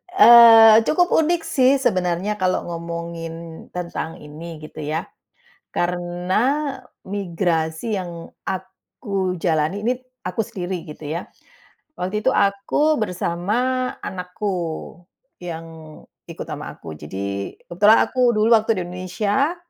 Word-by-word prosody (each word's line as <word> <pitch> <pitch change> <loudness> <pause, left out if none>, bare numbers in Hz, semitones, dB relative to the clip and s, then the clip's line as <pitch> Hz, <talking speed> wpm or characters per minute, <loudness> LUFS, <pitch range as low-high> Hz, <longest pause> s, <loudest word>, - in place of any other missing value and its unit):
Eee, 230 - +9
cukup 355 +7 +2
unik 330 +2 +3
sih, 260 -2 +3
sebenarnya, 185 -3 0
kalo 185 -2 0
ngomongin 170 -1 -5 0.4
tentang 170 -2 -5
ini, 155 +2 -9
gitu 155 0 -9
ya. 155 +3 -2 0.7
Karena, 175 +1 -2 0.7
migrasi 175 0 -1
yang 170 -2 -8 0.2
aku 190 0 -4
jalani 160 +3 0
ini, 245 - +3 0.3
aku 225 - -2
sendiri, 185 -6 -5
gitu 150 0 -10
ya. 170 +2 -4 0.7
Waktu 190 +4 -2
itu - - +6
aku 200 +10 +2
bersama 180 -1 -2 0.5
anakku, 180 +3 -4 0.9
yang 165 -2 -6 0.6
ikut - - -7
ama - - -6
aku. 80 - -9
Jadi, 100 +5 -5 0.2
kebetulan 205 +6 +5
aku, 250 -2 +2
dulu 215 +1 +3
waktu 220 0 +4
di - - -1
Indonesia, 200 - -1
180 Hz, 115 wpm, -22 LUFS, 170-215 Hz, 0.9 s, Eee